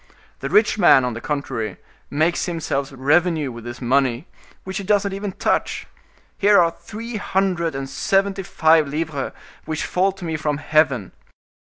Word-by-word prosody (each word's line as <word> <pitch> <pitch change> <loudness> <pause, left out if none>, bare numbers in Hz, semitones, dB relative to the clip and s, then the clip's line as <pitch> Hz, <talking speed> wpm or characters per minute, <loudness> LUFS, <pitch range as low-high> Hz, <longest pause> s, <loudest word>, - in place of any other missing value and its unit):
The - - -4
rich 215 0 +3
man, 135 -8 +6
on 125 - -2
the 115 - -7
contrary, 115 -9 -3 0.3
makes 160 +6 +1
himself 145 -5 -2
revenue 150 +2 +1
with 115 -1 -10
his 120 0 -7
money, 130 +2 +1 0.4
which 190 0 -5
he 200 - -4
does 205 0 +2
not 200 -1 -3
even 200 0 -4
touch. - - -1 0.5
Here 205 0 +5
are 170 -1 +4
three 225 +6 -7
hundred 185 -6 0
and 135 0 -4
seventy 195 +7 0
five 160 -4 +3
livres 150 -1 -3 0.3
which 155 0 -3
fall 190 +2 +1
to 190 -2 -9
me 160 -1 -2
from 150 -1 -1
heaven. 145 -8 +1
160 Hz, 165 wpm, -21 LUFS, 135-190 Hz, 0.5 s, man